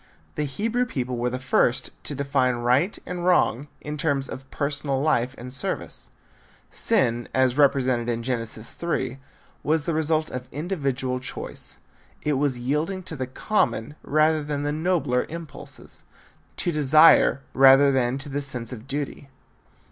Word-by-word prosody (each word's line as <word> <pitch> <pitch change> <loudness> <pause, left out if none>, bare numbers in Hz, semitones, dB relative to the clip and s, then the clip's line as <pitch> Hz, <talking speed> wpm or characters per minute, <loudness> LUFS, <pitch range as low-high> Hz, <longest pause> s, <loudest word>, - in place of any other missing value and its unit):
The 150 - -2
Hebrew 225 - -1
people 125 - -3
were 120 +1 -1
the 125 - -3
first 125 -1 +1
to 145 - -3
define 135 -2 +1
right 125 - +1
and 180 -1 -5
wrong 160 -6 +2
in 150 0 -5
terms 140 -3 0
of 130 0 -9
personal 140 -1 -1
life 135 -3 +1
and 125 +1 -8
service. 130 - -2 0.6
Sin 120 -2 +2
as 130 -1 +3
represented 130 -4 +2
in 115 -1 -2
Genesis 115 -3 -4
3 135 -6 -3 0.4
was 155 0 0
the 170 - 0
result 155 0 0
of 125 0 -6
individual 135 -5 -2
choice. 125 - -7 0.5
It 150 - +1
was 140 -2 0
yielding 150 +10 -2
to 160 - -6
the 130 -3 -3
common 130 - -1
rather 155 +1 +2
than 145 -1 -3
the 145 - 0
nobler 150 -6 0
impulses, 165 -2 -9 0.6
to 175 - 0
desire 155 -1 +5
rather 135 +1 +7
than 130 -1 +1
to 135 - -6
the 145 +1 -2
sense 125 -3 -5
of 120 +1 -10
duty. 140 0 -4
140 Hz, 150 wpm, -24 LUFS, 125-155 Hz, 0.6 s, rather